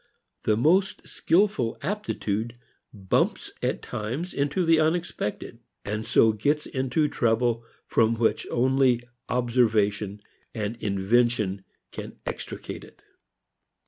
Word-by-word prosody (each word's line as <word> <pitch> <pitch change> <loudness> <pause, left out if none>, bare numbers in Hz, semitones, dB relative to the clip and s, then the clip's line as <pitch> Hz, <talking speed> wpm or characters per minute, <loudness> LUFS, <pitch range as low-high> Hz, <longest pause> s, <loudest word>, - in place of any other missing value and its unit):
The 105 -1 +3
most 180 - +2
skilful 165 - +1
aptitude 120 - -2 0.4
bumps 95 -3 0
at - - -1
times 125 +12 -4
into 145 +6 0
the 165 -1 +5
unexpected, 155 -8 -1 0.3
and 105 +2 -3
so 110 - +5
gets 145 +8 0
into 130 +3 0
trouble 115 -2 +1 0.2
from 115 0 +2
which 115 0 +1
only 130 -1 +3 0.3
observation 110 -5 +1 0.4
and 110 0 -2
invention 100 -1 +1 0.6
extricate - - -6
it. - - -17
120 Hz, 100 wpm, -26 LUFS, 110-145 Hz, 0.6 s, the